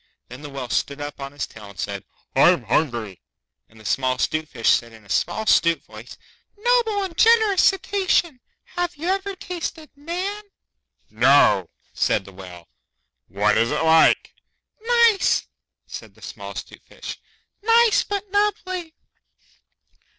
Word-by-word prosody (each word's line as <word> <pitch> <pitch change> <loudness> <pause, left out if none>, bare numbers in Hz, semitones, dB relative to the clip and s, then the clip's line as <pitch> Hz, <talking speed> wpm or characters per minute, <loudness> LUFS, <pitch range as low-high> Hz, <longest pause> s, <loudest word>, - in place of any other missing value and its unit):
Then 125 +3 -10
the 145 - -8
Whale 135 -3 -6
stood 140 +1 -1
up 145 0 -7
on 135 0 -6
his 145 -1 -4
tail 105 -2 -13
and 100 -3 -15
said, 100 -1 -4 0.3
'I'm - - +5
hungry.' 120 - -1 0.5
And 110 - -19
the 110 - -16
small 130 +5 0
'Stute 155 +4 -1
Fish 115 -6 0
said 115 -1 0
in 110 -2 -16
a - - -20
small 220 - -1
'stute 170 -5 +3
voice, - - -12 0.4
'Noble 450 -2 +1
and 370 -4 -6
generous 440 -2 +4
Cetacean, 380 -6 +1 0.4
have 355 -1 -2
you 325 +5 -4
ever 390 +1 -1
tasted 335 -4 -6
Man?' 365 +8 -4 0.7
'No,' 110 -6 +4 0.2
said 95 - 0
the 100 - -13
Whale. 90 -3 -12 0.6
'What 105 +3 +1
is 115 +1 +2
it - - -1
like?' 160 0 +4 0.5
'Nice,' 465 -3 +3 0.4
said - - -10
the - - -19
small - - -8
'Stute - - -9
Fish. - - -9 0.4
'Nice 460 +1 +4
but 405 0 -4
nubbly. 370 -5 -1
220 Hz, 145 wpm, -22 LUFS, -, 0.7 s, I'm